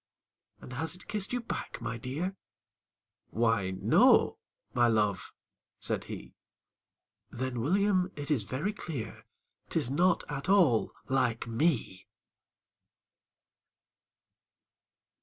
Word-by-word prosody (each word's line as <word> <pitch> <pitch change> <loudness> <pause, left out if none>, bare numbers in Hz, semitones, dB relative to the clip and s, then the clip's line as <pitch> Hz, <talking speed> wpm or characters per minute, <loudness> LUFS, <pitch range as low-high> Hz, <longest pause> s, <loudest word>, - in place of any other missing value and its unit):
"And 125 - -9
has 160 +7 -2
it 180 - -15
kissed 210 -2 -2
you 245 0 -1
back, 235 - -5
my 115 0 -4
dear?" 155 - -3 0.9
"Why 115 -4 +1
no 95 - +4 0.3
my 120 -1 +4
love," 105 -4 +1 0.5
said - - -1
he. - - -8 1.0
"Then, 130 0 -3
William, 190 - +2
it 145 +1 -5
is 140 -7 +3
very 140 - -2
clear 150 - -6 0.4
'Tis 120 - 0
not 175 +5 +3
at 140 +3 -4
all 170 - +4 0.2
LIKE 125 -4 +1
ME!" 115 - 0
135 Hz, 100 wpm, -30 LUFS, 115-180 Hz, 1.0 s, no